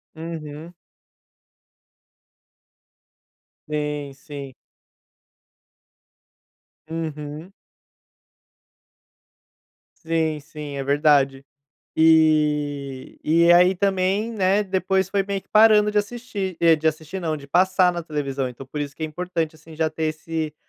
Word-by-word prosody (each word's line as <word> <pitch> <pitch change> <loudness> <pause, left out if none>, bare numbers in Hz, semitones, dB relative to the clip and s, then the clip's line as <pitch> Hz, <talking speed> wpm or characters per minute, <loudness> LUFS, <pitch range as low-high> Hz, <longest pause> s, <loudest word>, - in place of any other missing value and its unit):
Uhum. 160 0 -7 2.9
Sim, 150 -2 -3
sim. 140 -1 -9 2.4
Uhum. 155 +1 -6 2.5
Sim, 160 -1 0
sim, 150 -1 -8
é 135 - -3
verdade, 140 -1 +2 0.5
e 150 -4 +2
e 170 +2 +4
aí 180 +2 +6
também, 195 +3 0
né, 200 -1 +2
depois 190 0 0
foi 195 -1 +1
meio 200 0 -3
que - - -38
parando 215 -1 +6
de 210 - 0
assistir 205 -4 -3 0.2
de 160 +1 0
assistir 160 +4 -3
não, 160 -3 -2
de 140 -2 -10
passar 185 +4 +3
na 175 -1 -4
televisão, 140 -4 -3
então 125 +2 -9
por 150 +3 -6
isso 145 -1 -4
que 160 - -6
é - - +1
importante, 165 0 -3
assim, 160 0 -14
já 160 0 +1
ter 155 +1 -5
esse 155 0 -3
160 Hz, 105 wpm, -23 LUFS, 150-185 Hz, 2.9 s, aí